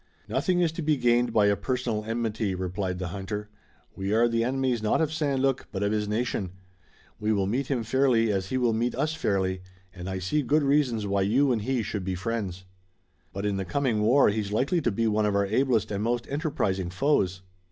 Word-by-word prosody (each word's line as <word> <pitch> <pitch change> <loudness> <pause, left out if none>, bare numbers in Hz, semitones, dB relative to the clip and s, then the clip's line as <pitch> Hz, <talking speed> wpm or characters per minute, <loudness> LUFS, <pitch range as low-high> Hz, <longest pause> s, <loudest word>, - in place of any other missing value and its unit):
"Nothing 180 -2 +1
is 170 -2 +2
to 165 - -5
be 155 -1 +2
gained 120 -1 +2
by 105 -2 +4
a 100 0 +4
personal 115 0 -2
enmity," 110 -3 -1
replied 90 0 -3
the 90 -1 -4
hunter. 105 +3 -5 0.5
"We 95 +1 -3
are 120 +1 +4
the 115 0 +1
enemies 130 -1 0
not 110 - +1
of 160 -1 0
St. 145 -4 0
Luc, 135 -1 0
but 100 0 -2
of 100 - +1
his 105 -1 0
nation. 105 -4 -2 0.7
We 110 +1 0
will 100 -3 +1
meet 125 +7 -1
him 130 -5 -1
fairly 115 -2 +2
as 95 -2 -1
he 130 - -1
will 120 -3 +2
meet 120 +2 0
us 150 +5 0
fairly, 95 -9 -1 0.3
and 90 0 -7
I 95 - -3
see 95 +12 0
good 150 +2 +2
reasons 135 -6 +2
why 100 0 0
you 130 +8 +3
and 115 -3 0
he 125 +1 -1
should 100 -1 -4
be 95 0 -2
friends." 95 -2 -3 0.7
"But 100 +1 -4
in 100 -1 0
the 95 - -1
coming 115 +3 0
war 120 +5 +5
he's 105 -1 -2
likely 140 - +1
to 120 - +1
be 115 +3 0
one 105 -1 +2
of 100 - 0
our 100 0 +2
ablest 115 +1 +1
and 100 0 -2
most 120 +1 0
enterprising 100 - -1
foes." 95 -5 +1
110 Hz, 215 wpm, -27 LUFS, 100-130 Hz, 0.7 s, war